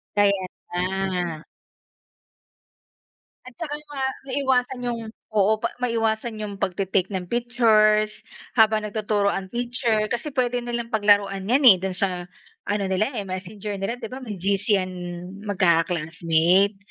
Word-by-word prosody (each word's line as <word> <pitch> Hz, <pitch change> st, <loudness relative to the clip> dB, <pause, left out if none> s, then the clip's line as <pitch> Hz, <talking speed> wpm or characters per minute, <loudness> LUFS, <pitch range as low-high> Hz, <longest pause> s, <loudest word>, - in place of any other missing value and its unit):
Kaya 200 Hz, -2 st, +3 dB, 0.2 s
nga. 180 Hz, -3 st, -2 dB, 2.0 s
At 255 Hz, -, -11 dB
tsaka 305 Hz, -3 st, -4 dB
nga 295 Hz, -2 st, -7 dB, 0.3 s
maiwasan 255 Hz, -2 st, 0 dB
'yong 235 Hz, -1 st, -2 dB, 0.3 s
oo, 210 Hz, +1 st, +4 dB
pa 235 Hz, -, -3 dB
maiwasan 225 Hz, -1 st, 0 dB
'yong 205 Hz, -2 st, -6 dB
pagte-take 190 Hz, 0 st, 0 dB
ng 190 Hz, -2 st, -3 dB
pictures 215 Hz, -2 st, +3 dB, 0.3 s
habang 220 Hz, -2 st, +4 dB
nagtuturo 205 Hz, -1 st, 0 dB
ang 190 Hz, -1 st, -4 dB
teacher. 240 Hz, -2 st, 0 dB
Kasi 240 Hz, +7 st, -3 dB
puwede 245 Hz, -2 st, 0 dB
nilang 235 Hz, -1 st, -4 dB
paglaruan 205 Hz, -1 st, +3 dB
'yan, 270 Hz, +3 st, +3 dB
eh, 195 Hz, -6 st, +10 dB
do'n 190 Hz, -1 st, -3 dB
sa 195 Hz, 0 st, +1 dB, 0.6 s
ano 205 Hz, -1 st, 0 dB
nila, 190 Hz, +6 st, +1 dB
eh, 205 Hz, -, -3 dB
Messenger 195 Hz, +2 st, -5 dB
nila, 230 Hz, +5 st, -2 dB
'di -, -, -7 dB
ba, 265 Hz, -, -6 dB
may 210 Hz, -6 st, -6 dB
GC 200 Hz, +3 st, +1 dB
'yan 185 Hz, -1 st, -3 dB, 0.5 s
magkaka-classmate. 170 Hz, 0 st, +2 dB
210 Hz, 130 wpm, -24 LUFS, 190-235 Hz, 2.0 s, eh